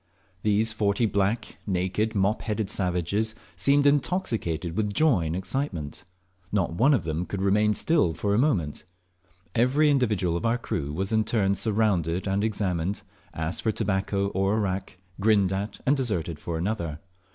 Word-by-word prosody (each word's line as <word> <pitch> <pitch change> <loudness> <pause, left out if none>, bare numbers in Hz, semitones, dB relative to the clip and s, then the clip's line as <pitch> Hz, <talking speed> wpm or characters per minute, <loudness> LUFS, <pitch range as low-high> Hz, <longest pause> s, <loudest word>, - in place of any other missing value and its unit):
These 110 +2 +2
forty 105 +1 +1
black, 100 +2 -1
naked, 95 +4 0
mop 100 +2 +1
headed 105 -2 -2
savages 95 +4 0 0.2
seemed 140 +1 +3
intoxicated 120 - 0
with 105 -1 -1
joy 125 - +3
and 80 - -2
excitement. 95 - -3 0.5
Not 95 -5 0
one 135 - +4
of 105 - -1
them 80 +1 -2
could 100 -1 -3
remain 105 +2 +3
still 90 - +2
for 100 +4 0
a 105 - +3
moment. 95 - 0 0.7
Every 135 +6 +3
individual 105 -11 +1
of 85 - -3
our 115 +1 +2
crew 75 -11 -3
was 95 +6 -2
in 110 0 +3
turn 100 -3 +1
surrounded 100 -5 0
and 100 +1 0
examined, 100 -4 -1 0.3
asked 80 +2 -3
for 110 - +1
tobacco 100 -1 0
or 95 +2 +1
arrack, 95 -3 -2 0.2
grinned 100 -2 +3
at 100 +2 -4
and 140 - +4
deserted 90 - -2
for 85 -1 -4
another. 85 -4 -2
100 Hz, 155 wpm, -26 LUFS, 90-110 Hz, 0.7 s, one